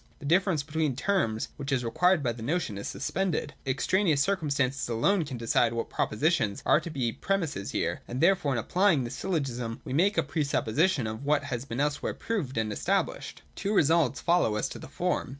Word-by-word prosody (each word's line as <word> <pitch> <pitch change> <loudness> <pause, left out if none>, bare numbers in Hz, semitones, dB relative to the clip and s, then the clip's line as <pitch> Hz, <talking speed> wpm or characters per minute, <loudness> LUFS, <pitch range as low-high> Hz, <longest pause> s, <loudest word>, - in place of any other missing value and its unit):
The 145 - -11
difference 175 -1 +2
between 155 -2 -1
the - - -7
terms 135 - 0
which 140 0 -5
is 125 -3 +1
required 180 +7 +3
by 120 - +1
the 115 0 -8
notion 145 - -1
is 100 - -5
suspended. 160 -1 -2
Extraneous 155 +4 +2
circum 165 0 +1
stances 135 -2 0
alone 160 - +2
can 135 -4 -6
decide 115 0 +2
what 115 0 -3
propositions 130 - 0
are - - +5
to 170 - -7
be 130 -7 -1
pre 195 +11 0
misses 145 - -4
here: - - -2
and 125 - -4
therefore 170 -4 +3
in - - -1
applying 175 - +2
this 120 - -5
syllogism 125 -10 -3
we 130 - -4
make 195 +8 +2
a - - +4
pre 145 +2 -1
supposition 145 +2 +1
of 110 +4 -5
what 145 0 +2
has 125 -3 -4
been 115 -3 -5
elsewhei'e 145 +1 -1
proved 170 - -3
and 110 -1 0
established. - - -2
189.] - - -32
Two 205 +2 -1
results 160 - +3
follow 170 -11 +2
as 105 - 0
to - - -8
the - - -9
form. - - -1
145 Hz, 210 wpm, -28 LUFS, 120-170 Hz, -, are